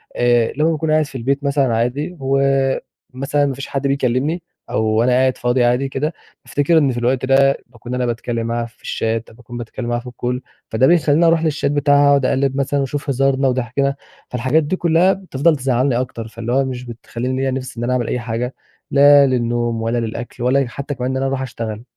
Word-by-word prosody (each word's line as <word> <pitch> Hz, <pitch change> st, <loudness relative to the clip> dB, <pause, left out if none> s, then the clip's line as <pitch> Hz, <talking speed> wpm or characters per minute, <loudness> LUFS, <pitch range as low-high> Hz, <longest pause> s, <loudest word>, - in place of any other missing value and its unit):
آآ، 120 Hz, -1 st, +2 dB
لمَّا 155 Hz, +2 st, +3 dB
باكون 160 Hz, 0 st, -1 dB
قاعد 155 Hz, 0 st, +3 dB
في 140 Hz, -2 st, -8 dB
البيت 135 Hz, +4 st, -1 dB
مثلًا 140 Hz, -4 st, +1 dB
عادي، 140 Hz, +10 st, -2 dB
و 135 Hz, 0 st, +1 dB, 0.7 s
مثلًا 140 Hz, +2 st, 0 dB
ما 140 Hz, -, -1 dB
فيش 140 Hz, +1 st, -7 dB
حد 140 Hz, 0 st, -2 dB
بيكلِّمني، 140 Hz, +5 st, 0 dB, 0.3 s
أو 110 Hz, -, 0 dB
وأنا 110 Hz, +3 st, +2 dB
قاعد 130 Hz, +1 st, +2 dB
فاضي 120 Hz, +1 st, +1 dB
عادي 125 Hz, +3 st, +1 dB
كده 150 Hz, +5 st, -2 dB, 0.3 s
بافتكر 145 Hz, +4 st, +2 dB
إن 145 Hz, -4 st, +3 dB
في 120 Hz, -, -5 dB
الوقت 125 Hz, +2 st, 0 dB
ده 135 Hz, +1 st, +4 dB
باكون 120 Hz, +1 st, -9 dB
أنا 125 Hz, 0 st, 0 dB
بتكلِّم 115 Hz, -1 st, -2 dB
معاها 120 Hz, 0 st, -1 dB
في 115 Hz, -, -17 dB
الChat 115 Hz, 0 st, -2 dB
أو -, -, -17 dB
باكون 120 Hz, 0 st, -10 dB
بتكلِّم 120 Hz, +1 st, -6 dB
معاها 120 Hz, 0 st, 0 dB
في 125 Hz, +1 st, -9 dB
الCall 125 Hz, +1 st, -3 dB, 0.3 s
فده 120 Hz, +4 st, +3 dB
بيخليني 165 Hz, -1 st, +4 dB
أروح 165 Hz, -1 st, +3 dB
للChat 155 Hz, -2 st, -1 dB
بتاعها 145 Hz, 0 st, +3 dB
وأقعد 140 Hz, -2 st, +4 dB
أقلِّب 135 Hz, +1 st, +1 dB
مثلًا، 140 Hz, +1 st, 0 dB
وأشوف 140 Hz, +1 st, -3 dB
هزارنا 135 Hz, 0 st, +2 dB
وضِحكِنا، 130 Hz, +2 st, 0 dB, 0.3 s
فالحاجات 130 Hz, +6 st, +1 dB
دي 150 Hz, +6 st, -1 dB
كلّها 175 Hz, +2 st, +3 dB
بتفضل 170 Hz, -4 st, +1 dB
تزعّلني 130 Hz, -1 st, +1 dB
أكتر، 115 Hz, -3 st, -6 dB
فاللي 115 Hz, +1 st, -5 dB
هو 135 Hz, +1 st, +3 dB
مش 125 Hz, -1 st, -5 dB
بتخليني 120 Hz, +2 st, -4 dB
ليّا 135 Hz, 0 st, 0 dB
نِفْس 130 Hz, -2 st, -5 dB
إن 115 Hz, -, -3 dB
أنا 125 Hz, +1 st, 0 dB
أعمل 125 Hz, -2 st, 0 dB
أي 125 Hz, -, -1 dB
حاجة، 120 Hz, +2 st, -3 dB, 0.4 s
لا 145 Hz, 0 st, +7 dB
للنوم 120 Hz, -2 st, 0 dB
ولا 115 Hz, +2 st, -1 dB
للأكل 120 Hz, +1 st, -4 dB
ولا 130 Hz, +3 st, +3 dB
اي 135 Hz, -, 0 dB
حتى 140 Hz, +4 st, -5 dB
كمان 125 Hz, +1 st, -2 dB
إن 130 Hz, -, -1 dB
أنا 135 Hz, -, -1 dB
أروح 135 Hz, 0 st, -2 dB
أشتغل. 115 Hz, -3 st, -5 dB
130 Hz, 210 wpm, -19 LUFS, 120-140 Hz, 0.7 s, لا